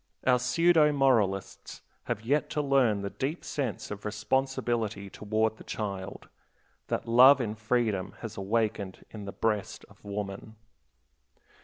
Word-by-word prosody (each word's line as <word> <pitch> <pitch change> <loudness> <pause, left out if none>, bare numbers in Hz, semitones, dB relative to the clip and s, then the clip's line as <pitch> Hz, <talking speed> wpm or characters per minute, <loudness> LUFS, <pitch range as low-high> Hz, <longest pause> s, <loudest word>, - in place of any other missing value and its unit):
Our 125 -1 +4
pseudo 150 +5 +4
moralists 115 -9 0 0.2
have 105 - -3
yet 145 +5 +1
to - - +3
learn 125 -8 +2
the 100 - -4
deep 145 +6 -4
sense 130 -9 -3
of 100 -1 -6
responsibility 110 -2 -1
toward 110 +1 -1
the - - -12
child, 100 -3 -5 0.6
that - - -2
love 130 +4 +8
in 110 -4 -2
freedom 110 -3 -1
has 110 -2 -6
awakened 105 -1 -2
in 105 -2 -8
the 100 - -5
breast 105 -2 -2
of - - -21
woman. 100 +1 -6
110 Hz, 135 wpm, -29 LUFS, 100-130 Hz, 0.6 s, love